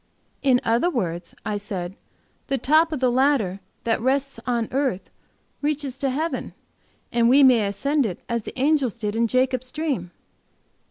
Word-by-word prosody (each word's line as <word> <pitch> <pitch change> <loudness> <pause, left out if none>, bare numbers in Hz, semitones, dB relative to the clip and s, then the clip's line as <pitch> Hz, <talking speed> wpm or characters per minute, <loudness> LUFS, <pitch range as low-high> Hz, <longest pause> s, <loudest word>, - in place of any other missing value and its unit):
"In 260 -3 +4
other 235 +10 +2
words," 175 - -3
I 210 - -1
said, 190 -3 -5 0.5
"the 275 - 0
top 315 +5 +3
of 305 - -2
the 255 -1 +3
ladder 250 -8 +2 0.2
that 225 -1 0
rests 275 +2 0
on 235 -2 0
earth 265 -8 -1 0.5
reaches 285 -3 -2
to 275 - +1
heaven, 310 +6 -3 0.6
and 235 0 +3
we 275 +3 +6
may 240 -6 +5
ascend 275 +6 +1
it 180 - -6
as 235 -1 -1
the 250 - -8
angels 275 -4 +2
did 215 -3 -3
in 230 +1 +2
Jacob's 255 +1 0
dream." 285 - -2
255 Hz, 160 wpm, -23 LUFS, 220-280 Hz, 0.6 s, we